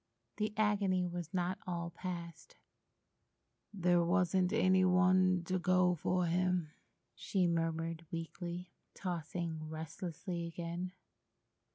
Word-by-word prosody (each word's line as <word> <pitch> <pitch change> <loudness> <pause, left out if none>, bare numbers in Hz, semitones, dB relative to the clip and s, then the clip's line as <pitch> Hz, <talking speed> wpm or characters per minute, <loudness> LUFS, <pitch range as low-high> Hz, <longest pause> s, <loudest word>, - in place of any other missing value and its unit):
The 215 0 0
agony 200 -4 +2
was 175 -2 -4
not 180 0 -1
all 170 -1 -3
passed. 170 -2 -7 1.2
"There 175 -3 +3
wasn't 180 +1 +2
any 185 -4 +4
one 185 0 +4
to 185 +2 -1
go 185 0 +4
for 180 +2 0
him," 180 -2 +1 0.4
she 190 -4 0
murmured 165 -1 -1
weakly, 175 +1 -5 0.2
tossing 165 -3 -3
restlessly 170 +2 -5
again. 170 +2 -4
175 Hz, 100 wpm, -35 LUFS, 170-185 Hz, 1.2 s, any